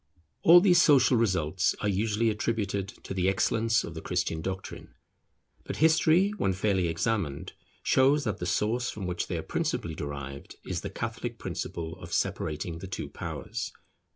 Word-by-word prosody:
All 175 +2 +8
these 175 -3 +6
social 135 -5 +5
results 95 -7 +1
are 105 - 0
usually 105 +3 +1
attributed 105 -3 -1 0.2
to - - -5
the 95 0 +2
excellence 115 +4 +2
of 85 - -7
the 80 - -7
Christian 80 -1 -1
doctrine; 95 +2 -6 0.7
but - - -5
history 160 +4 +4
when 95 - +1
fairly 95 -2 +1
examined 85 -4 -2 0.3
shows 140 +3 +4
that 110 -7 -2
the 90 - -3
source 115 +7 0
from 100 -2 -5
which 90 -1 -2
they - - -2
are - - -4
principally 85 - -2
derived 70 -2 -6
is - - -3
the - - -5
Catholic - - -4
principle 80 -1 -5
of - - -10
separating 80 +2 -2
the 95 - -7
two 95 - -5
powers. - - -5
100 Hz, 160 wpm, -28 LUFS, 85-115 Hz, 0.7 s, All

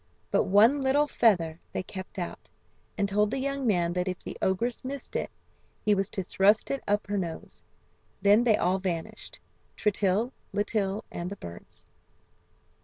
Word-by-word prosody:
But - - +3
one 225 +9 +5
little 280 +3 +3
feather 175 - +2
they - - -2
kept 190 +2 -8
out, 175 -2 -5 0.5
and 200 -1 +1
told 210 +1 +2
the 265 - -2
young 275 -1 -1
man 175 -5 +2
that 180 +1 -1
if 185 -1 -2
the - - -8
ogress 230 +7 0
missed 270 0 -6
it - - -1 0.6
he 210 - +5
was 195 -1 0
to 190 - -3
thrust 200 +4 +3
it 275 - -2
up 205 +1 +1
her 205 -1 -1
nose. 170 -3 -6 0.6
Then 205 +4 +5
they 225 -3 +4
all 185 +2 +1
vanished, 175 -4 -4 0.4
Tritill, 210 +3 +1 0.2
Litill, 205 0 0
and 175 +1 -4
the 200 - -5
birds. 85 - -11
205 Hz, 165 wpm, -28 LUFS, 185-230 Hz, 0.6 s, one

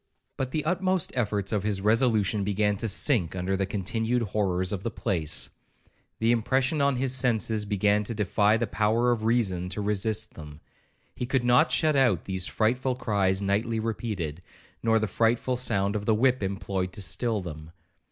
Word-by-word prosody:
But 130 -1 -3
the 150 +2 -3
utmost 185 +1 0
efforts 105 -5 -1
of 105 -3 0
his 100 -1 -1
resolution 110 -1 +2
began 105 +1 +1
to 115 +2 -2
sink 100 - +1
under 95 +1 -1
the 95 0 -1
continued 110 +5 -1
horrors 95 -3 -1
of 100 -3 -3
the 115 - -2
place. 80 -8 -2 0.7
The 115 +1 +2
impression 130 +5 +1
on 140 -1 +2
his 130 0 +1
senses 110 -4 +1
began 105 0 +1
to 115 - -4
defy 105 +1 +2
the 120 - -1
power 110 +3 +1
of 110 -2 -1
reason 95 -7 0
to 95 +3 -3
resist 105 +2 0
them. 75 -2 -11 0.6
He 125 - -4
could 130 -1 0
not 120 +1 +4
shut 155 -2 +2
out 120 - +2
these 95 -1 -1
frightful 125 +4 0
cries 100 -5 0
nightly 110 +3 0
repeated, 105 -8 -4 0.4
nor 115 0 +3
the 110 - 0
frightful 115 +3 +1
sound 105 -5 0
of 105 0 -4
the 110 - +4
whip 130 +3 +2
employed 95 -1 -3
to 105 - -3
still 110 +4 +1
them. 80 -4 -8
110 Hz, 175 wpm, -26 LUFS, 95-120 Hz, 0.7 s, not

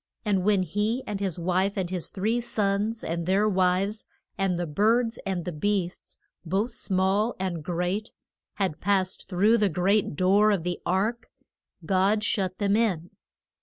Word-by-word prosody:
And 195 -3 +1
when 200 -1 +3
he 210 +8 -1
and 205 -2 -4
his 190 -4 -2
wife, 185 +3 0
and 185 -2 -2
his 180 -3 -2
three 220 +5 -1
sons 210 0 -1
and 170 +1 -3
their 200 +3 +3
wives, 190 +2 +1 0.3
and 195 -2 0
the 175 - -1
birds 225 +8 +1
and 185 -3 -2
the 180 - -3
beasts, 180 +2 -2 0.3
both 195 +8 -1
small 195 +4 0
and 175 -4 -3
great, 180 +6 -2 0.4
had 190 -6 -2
passed 190 -1 0
through 210 +5 +3
the 205 -1 +3
great 185 +1 +1
door 195 +5 +4
of 200 -6 +1
the 175 0 -3
ark, 220 +6 0 0.6
God 195 +4 +2
shut 190 -3 0
them 200 -1 +1
in. 190 -7 0
195 Hz, 160 wpm, -26 LUFS, 180-210 Hz, 0.6 s, door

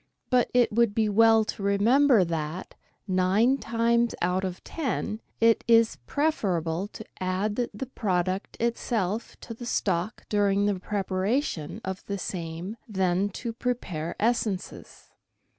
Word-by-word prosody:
But 250 -2 +3
it 245 -1 +3
would 225 -1 +2
be 220 -1 +2
well 225 +1 +5
to 215 - -5
remember 220 +4 +4
that, 165 +1 -4 0.3
nine 195 +8 +3
times 235 +1 +1
out 180 +2 0
of 185 -1 -4
ten, 255 -7 -3 0.2
it 230 0 +4
is 230 -1 +4
preferable 190 - 0
to 220 - -8
add 190 +3 -1 0.2
the 210 +6 -5
product 190 -6 -2
itself 230 -2 -1
to 230 - -7
the 235 +1 -8
stock 190 0 -1
during 205 -1 +2
the 205 -2 0
preparation 195 - -2
of 190 0 -4
the 200 - -2
same 175 +3 -5
than 190 -1 +1
to 230 +4 -5
prepare 200 -10 -3
essences. 215 -4 -2
205 Hz, 130 wpm, -27 LUFS, 185-230 Hz, 0.3 s, well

